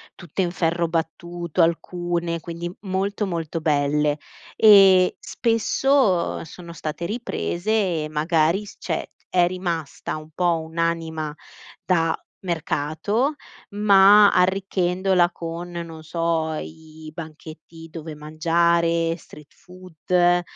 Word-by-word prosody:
tutte 175 +1 -4
in 175 -1 0
ferro 170 -1 0
battuto 170 +1 -2
alcune, 170 0 -1
quindi 170 0 -6
molto, 200 +1 -2
molto 165 -3 -3
belle. 150 0 +1 0.4
E 195 -4 +7
spesso 230 -5 +1
sono 170 +1 -11
state 160 +1 -5
riprese 215 -2 -3 0.3
e 155 - -5
magari 160 +5 +1
s - - -12
cioè, - - -4 0.2
è 175 -1 +3
rimasta 170 -5 -4
un 155 +1 -11
po' 175 -2 +1
un'anima 160 -1 -2 0.5
da 165 -3 +1 0.2
mercato, 170 - -1 0.4
ma 205 0 +6
arricchendola 185 -1 +2
con, 170 +1 -6
non 170 -2 -7
so, 165 0 -1
i 155 0 -9
banchetti 160 0 -10
dove 160 -1 -7
mangiare, 165 +2 +1
street 150 -3 -16
food 180 0 0
170 Hz, 105 wpm, -23 LUFS, 160-185 Hz, 0.5 s, E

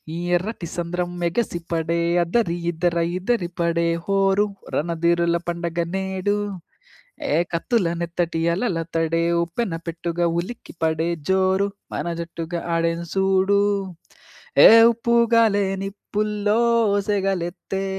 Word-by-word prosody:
ఈ - - -4 0.2
ఎర్రటి 185 -2 -5
సంద్రం 175 +1 -2
మెగసిపడే 170 -3 -1 0.2
అద్దరి, 175 -1 0 0.2
ఇద్దర 170 +1 -1 0.2
ఇద్దిరిపడే 175 -5 0 0.2
హోరు, 195 +1 +2 0.3
రణధీరుల 170 +1 +1
పండగ 170 0 -4 0.2
నేడు, 190 +1 -1 0.9
హే! - - -2 0.2
కత్తుల 190 +2 +1
నెత్తటి 170 -1 -2 0.2
అలల 195 -3 -1 0.2
తడే 165 0 +1 0.2
ఉప్పెన 170 +3 -3
పెట్టుగా, 170 +1 -2
ఉలికిపడే 165 -5 -3 0.2
జోరు, 190 +1 +2 0.3
మన - - -3
జట్టుగా 170 0 -5
ఆడెను 165 0 0
సూడు! 195 +1 +3 1.0
హే! - - +11 0.3
ఉప్పుగాలే 230 -3 +3 0.2
నిప్పుల్లో 210 +1 -2 0.5
సెగలెత్తే, 195 -1 -2
175 Hz, 95 wpm, -22 LUFS, 170-200 Hz, 1.0 s, హే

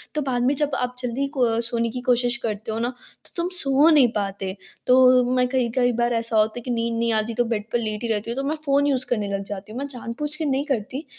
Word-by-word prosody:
तो 305 - 0
बाद 255 -3 -1
में 270 - +3
जब 295 +1 0
आप 250 0 -2
जल्दी 250 +2 -2
को 230 -3 +2
सोने 235 0 -1
की 250 +2 -5
कोशिश 245 -1 +2
करते 215 0 -3
हो 220 - -2
न 240 +1 0
तो 245 -1 -17
तुम 345 0 -1
सो 275 -1 +4
नहीं 295 -6 +6
पाते। 195 -2 -3 0.3
तो 255 0 +6
मैं 250 0 +3
कई 250 -2 +1
कई 245 -1 +3
बार 240 0 +2
ऐसा 230 -1 -1
होता 215 +2 +2
है - - -10
कि 250 - -3
नींद 230 -1 -1
नहीं 230 0 +1
आती 220 +1 0
तो 240 - +1
बेड 225 -3 -2
पर 240 - +1
लेटी 215 0 -3
रहती 215 -1 -2
हूँ - - -3
तो 270 - -1
मैं 310 - 0
फ़ोन 280 0 +3
यूज़ 260 -2 +1
करने 215 -4 0
लग 195 0 -2
जाती 200 +1 -8
हूँ। 235 - -5
मैं 280 - -3
जानबूझ 275 +3 -5
के 315 - -3
नहीं 275 0 0
करती। 265 +1 -3
245 Hz, 265 wpm, -23 LUFS, 225-265 Hz, 0.3 s, नहीं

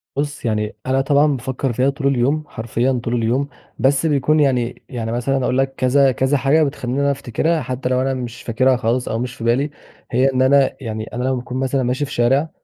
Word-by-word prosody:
بُصّ، 145 -2 -3
يعني 105 -1 -1
أنا 135 +1 +2
طبعًا 145 +1 +3
بافكّر 130 +1 -3
فيها 130 +4 +2
طول 140 0 -2
اليوم، 140 +4 +1
حرفيًا 120 +2 -1
طول 120 - -2
اليوم، 120 +5 0 0.3
بس 135 +5 +2
بيكون 150 +1 +2
يعني 125 -4 +1
يعني 115 -3 -4
مثلًا 130 +2 0
أقول 125 - 0
لك 135 0 +1
كذا 135 +1 +4
كذا 130 +4 +1
حاجة 140 +4 +3
بتخليني 135 -2 -2
إن - - +1
أنا 140 - +3
أفتكرها، 150 +5 -1
حتى 125 +1 -3
لو 130 0 +1
أنا 135 0 0
مش 125 -2 -6
فاكرها 130 +2 +2
خالص، 120 +2 -1
أو 110 - -1
مش 125 +1 -4
في 115 - -9
بالي، 130 +6 +1 0.4
هي 130 +3 +3
إن 130 - +1
أنا 135 0 +4
يعني 110 -2 -4
أنا 125 +1 -3
لمّا 130 0 +1
باكون 125 +1 -5
مثلًا 135 0 0
ماشي 130 +4 0
في 140 - -11
شارع 135 +6 +2
130 Hz, 220 wpm, -19 LUFS, 120-140 Hz, 0.4 s, كذا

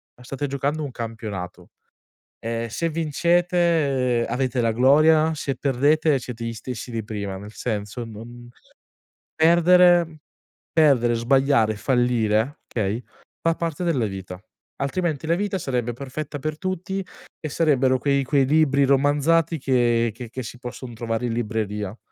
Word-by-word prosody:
ma 125 - -17
state 135 +3 -4
giocando 140 +3 -2
un 140 - -5
campionato, 110 -6 -6 0.7
ehm, 115 0 -3
se 165 +9 -2
vincete, 160 -6 +1
uhm, - - -3
avete 130 -1 0
la 115 -1 +1
gloria, 155 +6 +4
se 140 -2 -3
perdete 145 +3 +2
siete 120 -2 -7
gli 115 - -3
stessi 120 +2 -7
di 115 -1 -3
prima, 100 -3 -5
nel 105 +2 -10
senso 105 0 -4
non 120 +2 -10 0.9
perdere 170 0 +5 0.6
perdere, 130 -7 +4
sbagliare, 120 -2 +2
fallire, 120 +1 +1
okay, 110 +2 -2 0.4
fa 165 0 +1
parte 170 0 -3
della 145 -9 +1
vita, 95 -2 -7 0.4
altrimenti 155 +2 -2
la 165 - +3
vita 200 0 -2
sarebbe 125 -4 -2
perfetta 140 +4 -6
per 155 +2 -4
tutti 190 +1 -3 0.4
e 155 - -5
sarebbero 135 -5 +2
quei 140 +1 +1
quei 135 0 +2
libri 140 -1 +3
romanzati 145 +4 +2
che 120 -3 +2
che 120 +1 -9
che 130 +2 -6
si 120 +1 -9
posson 125 0 -8
trovare 115 +1 -3
in 115 - -2
libreria." 105 -2 -3
130 Hz, 140 wpm, -23 LUFS, 115-155 Hz, 0.9 s, perdere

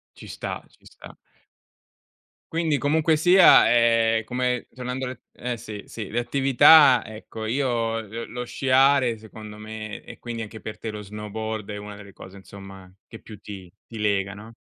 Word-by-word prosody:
Ci - - -12
sta, - - -6
ci - - -27
sta. - - -14 1.4
Quindi, 160 -3 0
comunque 155 +2 +2
sia, 180 +4 +7
è 115 -1 +3
come 125 0 -2
tornando 125 +1 -5
alle 125 -1 -8
eh 125 0 -4
sì, 105 -2 -8
sì, 110 -4 -7
le 120 +2 -1
attività, 135 +2 +6
ecco, 110 0 -8
io 115 -3 -1
lo 115 +2 -7
lo 125 +1 -6
sciare 130 -1 +2
secondo 110 -1 -11
me 110 0 -8
e - - -12
quindi 120 -1 -5
anche 110 0 -9
per 105 -1 -8
te 110 - -5
lo 105 0 -7
snowboard, 105 +1 -6
è 105 - -5
una 105 0 -9
delle 100 -1 -13
cose 95 +2 -13
insomma, 95 -1 -13 0.2
che 115 - -11
più 105 -3 -13
ti 95 -4 -10
ti 115 - -9
lega 100 -2 0
no. 110 +3 -12
115 Hz, 170 wpm, -24 LUFS, 105-125 Hz, 1.4 s, sia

